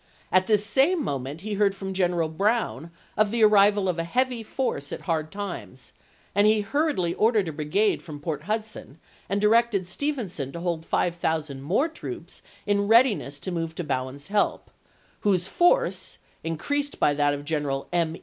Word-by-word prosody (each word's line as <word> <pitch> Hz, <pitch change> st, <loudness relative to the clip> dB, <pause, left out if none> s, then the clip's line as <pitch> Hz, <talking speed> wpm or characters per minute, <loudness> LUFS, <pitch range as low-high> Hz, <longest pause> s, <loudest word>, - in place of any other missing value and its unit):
1 185 Hz, -, +5 dB
At 185 Hz, -, -15 dB
this 210 Hz, -1 st, +3 dB
same 280 Hz, -, +3 dB
mo 140 Hz, -, -1 dB
ment 140 Hz, +6 st, -7 dB
he 215 Hz, +2 st, -4 dB
heard 200 Hz, -1 st, +2 dB
from 190 Hz, -1 st, -5 dB
General 175 Hz, -3 st, +1 dB
Bowen 190 Hz, -, -1 dB, 0.3 s
of 215 Hz, -1 st, +3 dB
the 230 Hz, +1 st, +1 dB
arrival 205 Hz, -1 st, +5 dB
of 175 Hz, -2 st, -1 dB
a -, -, 0 dB
heavy 250 Hz, +6 st, 0 dB
force 215 Hz, -, -3 dB
at -, -, -5 dB
Hard 155 Hz, -2 st, -2 dB
Times, 185 Hz, -, -7 dB, 0.4 s
and 205 Hz, +2 st, +4 dB
he 215 Hz, 0 st, +4 dB
hurriedly 205 Hz, -, 0 dB
ordered 215 Hz, -4 st, +2 dB
a -, -, -2 dB
brigade 160 Hz, +8 st, +1 dB
from 150 Hz, -3 st, -9 dB
Port 150 Hz, 0 st, -4 dB
Hudson 215 Hz, -, -4 dB, 0.3 s
and 200 Hz, +2 st, 0 dB
directed 215 Hz, -2 st, +3 dB
Stevenson 190 Hz, -, -3 dB
to 170 Hz, -, -5 dB
hold 170 Hz, -2 st, -3 dB
5000 160 Hz, -5 st, -1 dB
more 185 Hz, -, +1 dB
troops 325 Hz, -, -8 dB, 0.2 s
in 200 Hz, 0 st, +1 dB
readiness 225 Hz, -, +4 dB
to 185 Hz, +6 st, -5 dB
move 165 Hz, -2 st, -3 dB
to 175 Hz, -, -3 dB
Bowen's 135 Hz, +1 st, -4 dB
help, 205 Hz, 0 st, 0 dB, 0.5 s
whose 185 Hz, -4 st, +1 dB
force, 485 Hz, -, +1 dB, 0.3 s
increased 285 Hz, -, -2 dB
by 145 Hz, -, +3 dB
that 145 Hz, 0 st, +2 dB
of 145 Hz, 0 st, -8 dB
General 145 Hz, -3 st, -2 dB
M. 165 Hz, -2 st, +1 dB
190 Hz, 175 wpm, -25 LUFS, 160-215 Hz, 0.5 s, 1